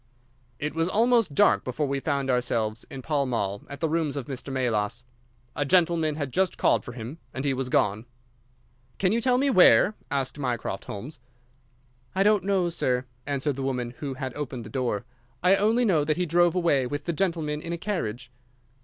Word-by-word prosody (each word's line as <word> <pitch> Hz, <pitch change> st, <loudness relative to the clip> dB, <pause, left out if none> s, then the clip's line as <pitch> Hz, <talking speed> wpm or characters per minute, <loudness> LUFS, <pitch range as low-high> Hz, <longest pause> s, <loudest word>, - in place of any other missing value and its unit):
It 150 Hz, 0 st, -3 dB
was 165 Hz, +2 st, 0 dB
almost 230 Hz, -, +3 dB
dark 100 Hz, -7 st, +4 dB
before 130 Hz, +4 st, -2 dB
we 140 Hz, 0 st, -1 dB
found 140 Hz, -2 st, -1 dB
ourselves 115 Hz, -3 st, -1 dB
in 130 Hz, -1 st, -8 dB
Pall 145 Hz, -3 st, 0 dB
Mall, 100 Hz, -5 st, -2 dB
at 140 Hz, 0 st, -8 dB
the 160 Hz, -, +2 dB
rooms 155 Hz, -3 st, -1 dB
of 135 Hz, -, -4 dB
Mr. 135 Hz, +1 st, -6 dB
Melas. 120 Hz, -3 st, -1 dB, 0.5 s
A 145 Hz, -, 0 dB
gentleman 165 Hz, -1 st, +2 dB
had 145 Hz, -4 st, -4 dB
just 190 Hz, -1 st, +1 dB
called -, -, +3 dB
for 120 Hz, -, -8 dB
him, 120 Hz, +7 st, -7 dB, 0.2 s
and 130 Hz, +2 st, -3 dB
he 140 Hz, -, +2 dB
was 130 Hz, -1 st, -3 dB
gone. 105 Hz, 0 st, +1 dB, 0.9 s
"Can 185 Hz, -1 st, +2 dB
you 230 Hz, +2 st, +1 dB
tell 250 Hz, +1 st, +3 dB
me 275 Hz, +1 st, +2 dB
where?" 185 Hz, 0 st, +6 dB, 0.2 s
asked 140 Hz, 0 st, -2 dB
Mycroft 120 Hz, -7 st, -3 dB
Holmes. 130 Hz, +8 st, -7 dB, 1.0 s
"I 195 Hz, -, +3 dB
don't 210 Hz, -2 st, +4 dB
know, 190 Hz, -2 st, +1 dB
sir," 130 Hz, -6 st, 0 dB, 0.2 s
answered 140 Hz, 0 st, -1 dB
the -, -, -3 dB
woman 125 Hz, -3 st, -2 dB
who 140 Hz, -3 st, -4 dB
had 130 Hz, -1 st, -5 dB
opened 130 Hz, -4 st, -5 dB
the 105 Hz, -, -10 dB
door; 120 Hz, -6 st, -1 dB, 0.4 s
"I 185 Hz, +2 st, +6 dB
only 225 Hz, +5 st, +2 dB
know 165 Hz, -8 st, +3 dB
that 155 Hz, +2 st, 0 dB
he 180 Hz, -, +1 dB
drove 175 Hz, +1 st, +3 dB
away 155 Hz, -8 st, +2 dB
with 145 Hz, +3 st, -4 dB
the 170 Hz, -, -1 dB
gentleman 160 Hz, -4 st, -1 dB
in 170 Hz, -, -5 dB
a 170 Hz, -, -2 dB
carriage." 130 Hz, -, -4 dB
145 Hz, 195 wpm, -26 LUFS, 125-170 Hz, 1.0 s, where